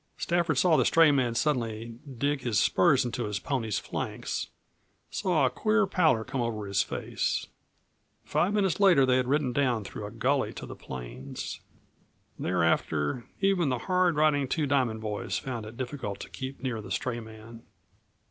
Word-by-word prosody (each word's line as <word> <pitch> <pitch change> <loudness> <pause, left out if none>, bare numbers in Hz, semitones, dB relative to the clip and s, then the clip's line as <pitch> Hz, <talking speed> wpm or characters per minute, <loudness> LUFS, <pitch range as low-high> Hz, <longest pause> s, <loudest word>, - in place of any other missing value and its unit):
Stafford 170 -4 +1
saw 160 +3 +4
the - - +4
stray 165 -2 +5
man 125 -4 +1
suddenly 115 -4 -1 0.2
dig 140 +2 0
his 120 -5 0
spurs 125 +8 +4
into 120 0 -2
his 105 -1 -2
pony's 110 -3 -2
flanks, - - -4 0.6
saw 175 -8 +2
a - - +3
queer 215 - +2
pallor 160 -12 +2
come 130 +2 -3
over 110 -3 -2
his 100 0 +1
face. - - -2 0.8
Five 175 +7 +1
minutes 195 -4 +1
later 180 -9 +6
they 130 0 +3
had 130 -1 0
ridden 140 -2 +1
down 125 -6 +1
through 105 +1 -7
a - - -7
gully 130 +5 0
to - - -7
the - - -8
plains. 65 0 -7 0.8
Thereafter, 85 +2 0 0.2
even 195 -6 +3
the 125 - 0
hard 180 +6 +2
riding 150 -2 +3
Two 155 +3 0
Diamond 130 -6 +1
boys 105 -2 -3
found 120 -5 -5
it 110 +2 -11
difficult 130 -6 -4
to - - -8
keep 130 +1 -6
near 120 -4 -2
the - - -10
stray 120 -2 -2
man. 110 +1 -11
125 Hz, 165 wpm, -28 LUFS, 110-150 Hz, 0.8 s, later